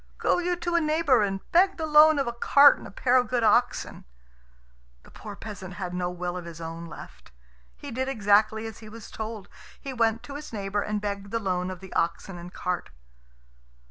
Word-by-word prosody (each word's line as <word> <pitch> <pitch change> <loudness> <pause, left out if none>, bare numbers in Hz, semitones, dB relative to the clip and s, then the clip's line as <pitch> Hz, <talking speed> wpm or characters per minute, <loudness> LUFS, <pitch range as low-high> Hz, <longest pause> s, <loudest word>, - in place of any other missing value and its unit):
"Go - - +1
you 355 0 0
to 345 0 -3
a 340 - +3
neighbour 305 -5 +3
and 195 -1 -1
beg 375 +3 +4
the 320 - -2
loan 305 0 +6
of 275 - +1
a 235 - -3
cart 280 +4 +6
and - - -10
a - - -11
pair 250 +5 +2
of 250 - +2
good 245 -2 0
oxen." 235 +3 +1 1.0
The - - -18
poor 205 -1 -9
peasant 195 -4 -8
had 180 -2 -5
no 180 0 -2
will 180 0 -4
of 180 -1 -6
his 170 -1 -9
own 165 +1 -7
left. 165 - -12 0.4
He - - -9
did 260 +3 -2
exactly 215 -2 +2
as 225 -1 -8
he 215 - -11
was 225 0 -11
told. 220 -2 -6 0.3
He 275 - -6
went 230 -2 +1
to 280 - -9
his 290 +1 -8
neighbour 205 -1 -2
and 210 0 -2
begged 200 -1 -4
the 230 - -1
loan 185 -4 -2
of 185 0 -7
the 190 - -11
oxen 170 +2 -2
and 175 +1 -10
cart. 180 -1 -3
215 Hz, 210 wpm, -26 LUFS, 185-260 Hz, 1.0 s, loan